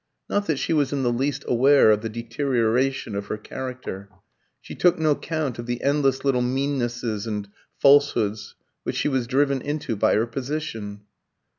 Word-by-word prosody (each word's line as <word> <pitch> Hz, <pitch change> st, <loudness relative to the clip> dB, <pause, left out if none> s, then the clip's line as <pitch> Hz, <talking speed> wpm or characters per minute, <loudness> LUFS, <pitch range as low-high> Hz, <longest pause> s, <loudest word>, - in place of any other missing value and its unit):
Not 205 Hz, 0 st, -1 dB
that 155 Hz, -, +1 dB
she 165 Hz, -, -1 dB
was 145 Hz, -4 st, +1 dB
in 140 Hz, -2 st, -1 dB
the 120 Hz, -1 st, +1 dB
least 135 Hz, +3 st, -2 dB
aware 130 Hz, -1 st, +5 dB
of 105 Hz, 0 st, +2 dB
the 115 Hz, -, -4 dB
deterioration 120 Hz, +1 st, 0 dB
of 100 Hz, 0 st, -4 dB
her -, -, -3 dB
character. 125 Hz, -4 st, -7 dB, 0.5 s
She -, -, -10 dB
took 180 Hz, -1 st, +3 dB
no 155 Hz, -2 st, +3 dB
count 150 Hz, -5 st, -3 dB
of 120 Hz, -, -6 dB
the 120 Hz, 0 st, -3 dB
endless 140 Hz, -1 st, +1 dB
little 130 Hz, -3 st, +2 dB
meannesses 125 Hz, -4 st, -1 dB
and 105 Hz, -2 st, -3 dB, 0.3 s
falsehoods 120 Hz, -8 st, +3 dB, 0.3 s
which -, -, -4 dB
she -, -, 0 dB
was 130 Hz, -4 st, 0 dB
driven 140 Hz, +1 st, +1 dB
into 145 Hz, -5 st, -3 dB
by 100 Hz, -, +2 dB
her 110 Hz, +2 st, +2 dB
position. 115 Hz, -5 st, -5 dB
130 Hz, 170 wpm, -24 LUFS, 115-140 Hz, 0.5 s, aware